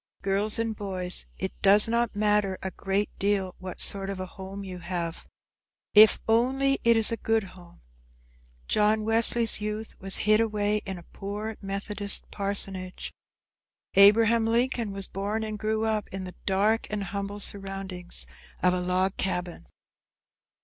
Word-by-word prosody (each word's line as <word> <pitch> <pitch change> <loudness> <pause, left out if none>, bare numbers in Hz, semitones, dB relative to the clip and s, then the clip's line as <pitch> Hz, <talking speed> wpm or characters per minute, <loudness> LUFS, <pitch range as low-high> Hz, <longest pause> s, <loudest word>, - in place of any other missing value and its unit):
Girls 200 +2 +2
and 225 -1 -2
boys, 185 -3 0
it 190 - -3
does 205 +3 +7
not 235 -1 0
matter 205 -2 +1
a 190 - -3
great 195 +2 -2
deal 195 -2 0
what 185 -1 -8
sort 195 -1 +2
of 195 -1 -5
a 185 - -4
home 190 +2 -9
you 185 -2 -8
have, 170 -1 -5 0.7
if 215 +1 +7
only 265 +4 +2
it 235 0 +4
is 225 0 +4
a 230 - -2
good 225 -1 0
home. 180 -2 -15 0.9
John 215 +1 +2
Wesley's 225 0 +3
youth 215 +1 -5
was 195 0 +4
hid 215 0 +5
away 210 -2 0
in 190 -1 -5
a 175 - -12
poor 210 +2 -5
Methodist 200 +1 -1
parsonage. 195 -2 +1 0.8
Abraham 225 +3 +5
Lincoln 235 -1 0
was 195 0 -4
born 205 +3 -3
and 215 -1 -5
grew 220 +1 -1
up 215 -2 -1
in 190 0 -7
the 180 -1 -8
dark 205 +4 +1
and 210 -1 -3
humble 200 +1 -5
surroundings 195 -3 -4 0.4
of 180 0 +4
a 180 - -1
log 185 +2 -1
cabin. 180 - -4
200 Hz, 150 wpm, -26 LUFS, 190-220 Hz, 0.9 s, does